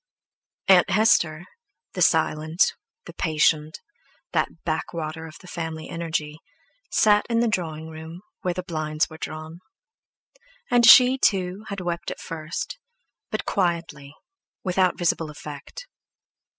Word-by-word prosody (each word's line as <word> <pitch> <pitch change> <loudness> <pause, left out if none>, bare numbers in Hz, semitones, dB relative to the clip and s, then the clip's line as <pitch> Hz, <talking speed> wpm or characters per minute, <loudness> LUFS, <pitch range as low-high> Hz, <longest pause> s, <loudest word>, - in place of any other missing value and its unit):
Aunt 185 -2 +6
Hester, 180 -5 +3 0.5
the 180 - -4
silent, 160 0 +2 0.3
the - - -10
patient, 155 -1 +1 0.5
that - - -1
backwater 160 -1 -3
of 155 - -12
the 185 - -14
family 160 -2 -5
energy, 160 -2 -3 0.5
sat 210 -1 +4
in 230 -1 +2
the 235 - +2
drawing 160 -6 -2
room, 160 +2 -9 0.2
where 180 -1 -1
the 185 - -3
blinds 155 -3 -2
were 160 - -10
drawn; 155 +2 -7 1.1
and 240 -1 +5
she, 255 +2 +9
too, 190 -1 +1
had 200 -2 -5
wept 170 -1 -3
at - - -6
first, 165 - -5 0.5
but - - -3
quietly, 165 -6 -2 0.5
without 185 -1 +1
visible 165 -2 0
effect. 150 - -9
165 Hz, 125 wpm, -24 LUFS, 155-185 Hz, 1.1 s, she